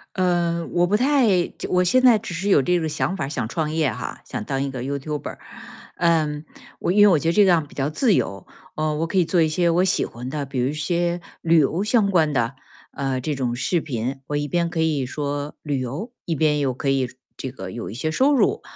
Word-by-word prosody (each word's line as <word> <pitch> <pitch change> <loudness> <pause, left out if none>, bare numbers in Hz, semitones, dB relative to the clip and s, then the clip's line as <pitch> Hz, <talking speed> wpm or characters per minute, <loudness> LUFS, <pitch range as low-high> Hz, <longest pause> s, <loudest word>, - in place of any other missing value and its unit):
呃， 175 -3 +1
我 175 0 +2
不 200 - +2
太 235 -8 +3
就 - - -5
我 180 0 +3
现 255 +9 +3
在 250 -3 +6
只 205 -4 -7
是 175 +4 -3
有 190 -8 +5
这 180 +5 +1
个 160 - -2
想 155 +4 -1
法， 170 - -2
想 130 -5 -2
创 155 +4 -1
业 155 -4 +1
哈， 125 +3 -6
想 - - -5
当 135 +2 -1
一 140 - -3
个 130 -2 -5
YouTuber， 140 +2 -4 0.6
嗯， 155 -3 +1 0.5
因 205 +3 +4
为 205 - +9
我 175 -6 +4
觉 165 - -2
得 165 - +3
这 210 - +6
样 170 -5 +3
比 - - -17
较 140 +1 -1
自 215 - +2
由， 100 - -1 0.3
呃， 155 0 -1
我 160 +2 -1
可 190 - -2
以 180 - +4
做 170 +1 +2
一 160 - +3
些 170 +2 +1
我 170 +2 +3
喜 190 - +2
欢 125 +2 -8
的， 145 +1 -3
比 135 -1 -7
如 125 - +1
一 - - -3
些 170 +3 -1 0.2
旅 165 0 +3
游 160 +6 +1
相 215 -1 +2
关 165 -5 +3
的， 120 -2 0 0.4
呃， 135 -2 -2
这 145 +3 -2
种 125 -3 -1
视 170 +6 0
频。 130 -2 -4
我 145 - -1
一 145 0 -2
边 170 +2 0
可 165 - -4
以 155 -4 +1
说 145 +2 -4
旅 145 -3 -1
游， 155 - -5
一 170 - -2
边 150 -1 +2
又 135 -3 0
可 135 - -5
以 135 -2 +1 0.3
这 130 - -5
个 95 -7 -8
有 115 - -6
一 - - -7
些 135 +7 -2
收 265 - +3
入， 405 - +2
155 Hz, 280 characters per minute, -23 LUFS, 135-175 Hz, 0.6 s, 为